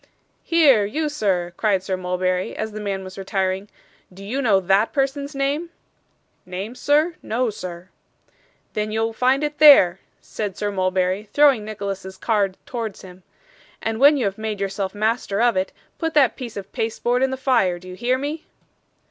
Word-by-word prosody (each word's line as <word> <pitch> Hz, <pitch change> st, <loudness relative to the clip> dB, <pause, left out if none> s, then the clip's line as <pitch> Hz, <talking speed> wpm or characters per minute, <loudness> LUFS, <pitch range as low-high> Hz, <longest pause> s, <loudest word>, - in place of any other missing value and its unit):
'Here, 295 Hz, -10 st, +5 dB
you 300 Hz, +10 st, -2 dB
sir,' 185 Hz, -10 st, -1 dB
cried 200 Hz, -4 st, +1 dB
Sir 190 Hz, 0 st, -2 dB
Mulberry, 185 Hz, 0 st, -1 dB
as 220 Hz, 0 st, -3 dB
the 215 Hz, -, -7 dB
man 200 Hz, -2 st, -3 dB
was 185 Hz, +1 st, -9 dB
retiring; 190 Hz, 0 st, -2 dB, 0.4 s
'do 195 Hz, +2 st, -11 dB
you 260 Hz, +7 st, -2 dB
know 210 Hz, -7 st, +4 dB
THAT 195 Hz, +4 st, +2 dB
person's 280 Hz, 0 st, -1 dB
name?' 285 Hz, +5 st, -1 dB, 0.7 s
'Name, 190 Hz, +5 st, -6 dB
sir? 295 Hz, +6 st, +2 dB
No, 235 Hz, +1 st, -1 dB
sir.' 185 Hz, -3 st, -8 dB, 0.8 s
'Then 215 Hz, 0 st, -2 dB
you'll 225 Hz, +1 st, -1 dB
find 260 Hz, +5 st, +2 dB
it 295 Hz, 0 st, -3 dB
there,' 230 Hz, -, +8 dB, 0.2 s
said 205 Hz, -4 st, -5 dB
Sir 205 Hz, 0 st, -2 dB
Mulberry, 185 Hz, +1 st, 0 dB
throwing 280 Hz, -7 st, +5 dB
Nicholas's 195 Hz, -3 st, -6 dB
card 200 Hz, -4 st, 0 dB
towards 225 Hz, -5 st, -5 dB
him; 185 Hz, 0 st, -13 dB, 0.6 s
'and 225 Hz, 0 st, -3 dB
when 285 Hz, +2 st, +7 dB
you 250 Hz, -, 0 dB
have 195 Hz, +1 st, -2 dB
made 215 Hz, -2 st, -3 dB
yourself 195 Hz, 0 st, -3 dB
master 215 Hz, -1 st, 0 dB
of 240 Hz, 0 st, +3 dB
it, 185 Hz, 0 st, -1 dB, 0.3 s
put 325 Hz, -2 st, -2 dB
that 275 Hz, -5 st, +4 dB
piece 240 Hz, -5 st, -7 dB
of 195 Hz, 0 st, -7 dB
pasteboard 240 Hz, +2 st, -1 dB
in 265 Hz, -, +3 dB
the 265 Hz, -, -3 dB
fire 245 Hz, -10 st, +2 dB
do 185 Hz, +1 st, -14 dB
you 180 Hz, -, -8 dB
hear 245 Hz, +5 st, 0 dB
me? 295 Hz, +4 st, -5 dB
215 Hz, 175 wpm, -22 LUFS, 190-260 Hz, 0.8 s, there